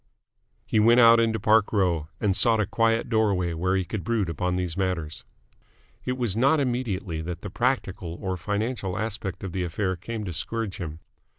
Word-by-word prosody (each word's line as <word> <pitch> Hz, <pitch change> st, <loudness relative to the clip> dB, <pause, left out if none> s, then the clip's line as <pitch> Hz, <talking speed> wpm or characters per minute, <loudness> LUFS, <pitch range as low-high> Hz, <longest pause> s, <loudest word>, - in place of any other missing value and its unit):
He 110 Hz, -, +1 dB
went 115 Hz, +3 st, +6 dB
out 115 Hz, -1 st, +8 dB
into 110 Hz, -1 st, +1 dB
Park 110 Hz, +1 st, +3 dB
Row, 90 Hz, -7 st, +1 dB
and 100 Hz, -3 st, +1 dB
sought 110 Hz, +3 st, +3 dB
a 105 Hz, -, +2 dB
quiet 115 Hz, +1 st, +1 dB
doorway 100 Hz, -7 st, +1 dB
where 90 Hz, +3 st, 0 dB
he 95 Hz, -1 st, 0 dB
could 100 Hz, +3 st, -4 dB
brood 110 Hz, -6 st, 0 dB
upon 90 Hz, +3 st, -1 dB
these 90 Hz, -3 st, -2 dB
matters. 90 Hz, -5 st, -2 dB, 0.8 s
It 125 Hz, 0 st, -1 dB
was 120 Hz, -6 st, -1 dB
not 135 Hz, +7 st, +3 dB
immediately 110 Hz, -, -2 dB
that 85 Hz, +1 st, -5 dB
the 105 Hz, -, -6 dB
practical 95 Hz, -9 st, -1 dB
or 95 Hz, -1 st, -2 dB
financial 100 Hz, +1 st, -2 dB
aspect 105 Hz, -3 st, -3 dB
of 95 Hz, -, -4 dB
the 95 Hz, -, -2 dB
affair 95 Hz, +2 st, -1 dB
came 110 Hz, +5 st, -6 dB
to 90 Hz, -3 st, -5 dB
scourge 110 Hz, +3 st, -3 dB
him. 80 Hz, -2 st, -6 dB
100 Hz, 185 wpm, -26 LUFS, 90-115 Hz, 0.8 s, out